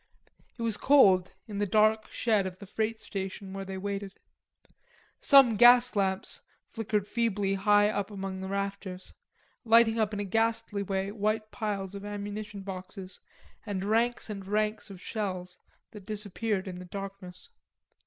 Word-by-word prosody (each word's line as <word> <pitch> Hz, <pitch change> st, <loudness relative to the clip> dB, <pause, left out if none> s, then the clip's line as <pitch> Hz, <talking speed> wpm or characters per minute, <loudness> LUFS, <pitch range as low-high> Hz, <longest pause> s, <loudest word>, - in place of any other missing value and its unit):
It 235 Hz, -, -4 dB
was 225 Hz, -2 st, -1 dB
cold 195 Hz, -11 st, +5 dB
in 205 Hz, -2 st, -5 dB
the 205 Hz, -, +1 dB
dark 215 Hz, +2 st, +3 dB
shed 215 Hz, -5 st, +1 dB
of 185 Hz, -1 st, -8 dB
the 200 Hz, -, -10 dB
freight 220 Hz, +3 st, -2 dB
station 195 Hz, -1 st, -6 dB
where 195 Hz, 0 st, -5 dB
they 190 Hz, 0 st, -6 dB
waited. 200 Hz, 0 st, -5 dB, 1.0 s
Some 270 Hz, -6 st, +6 dB
gas 245 Hz, +1 st, +7 dB
lamps 190 Hz, -1 st, -1 dB, 0.3 s
flickered 215 Hz, -3 st, -1 dB
feebly 205 Hz, -3 st, 0 dB
high 205 Hz, +1 st, +4 dB
up 205 Hz, -1 st, -2 dB
among 195 Hz, -2 st, -5 dB
the 190 Hz, -, -4 dB
rafters, 195 Hz, -1 st, -4 dB, 0.5 s
lighting 230 Hz, -1 st, +5 dB
up 215 Hz, -1 st, +1 dB
in 205 Hz, -, -4 dB
a -, -, -1 dB
ghastly 225 Hz, 0 st, 0 dB
way 195 Hz, 0 st, -2 dB
white 215 Hz, +1 st, -1 dB
piles 200 Hz, -4 st, -3 dB
of 200 Hz, 0 st, -7 dB
ammunition 205 Hz, 0 st, -6 dB
boxes 185 Hz, 0 st, -8 dB, 0.4 s
and 195 Hz, -3 st, -3 dB
ranks 230 Hz, +3 st, +1 dB
and 200 Hz, -3 st, -7 dB
ranks 215 Hz, +1 st, -1 dB
of 195 Hz, -2 st, -10 dB
shells 185 Hz, -3 st, -4 dB, 0.3 s
that 205 Hz, -3 st, -12 dB
disappeared 210 Hz, -1 st, -2 dB
in 180 Hz, -1 st, -6 dB
the 180 Hz, -, -8 dB
darkness. 195 Hz, -1 st, -8 dB
205 Hz, 155 wpm, -29 LUFS, 195-220 Hz, 1.0 s, gas